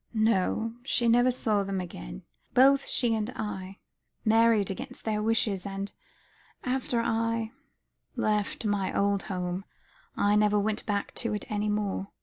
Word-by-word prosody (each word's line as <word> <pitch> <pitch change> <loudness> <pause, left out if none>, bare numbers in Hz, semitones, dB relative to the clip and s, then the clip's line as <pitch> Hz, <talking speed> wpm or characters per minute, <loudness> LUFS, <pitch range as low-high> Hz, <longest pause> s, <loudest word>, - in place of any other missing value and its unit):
"No, 220 +1 +2
she 245 -2 +1
never 245 +2 +5
saw 220 -5 +1
them 195 -1 -2
again. - - -7 0.3
Both 275 +2 +6
she 240 -3 +1
and 220 0 -1
I 195 -2 -5 0.5
married 225 -2 +4
against 190 - -7
their 215 -1 0
wishes, 215 -4 +1
and 195 0 -5 0.7
after 250 -2 0
I 230 0 0 0.6
left 210 +1 0
my 205 -2 0
old 200 0 +2
home, 180 -1 -3 0.5
I 205 +1 +3
never 210 0 +4
went 210 +1 -1
back 205 -1 -1
to 230 -3 -1
it 210 - -4
any 210 0 0
more. 205 -2 -1
210 Hz, 140 wpm, -28 LUFS, 200-230 Hz, 0.7 s, Both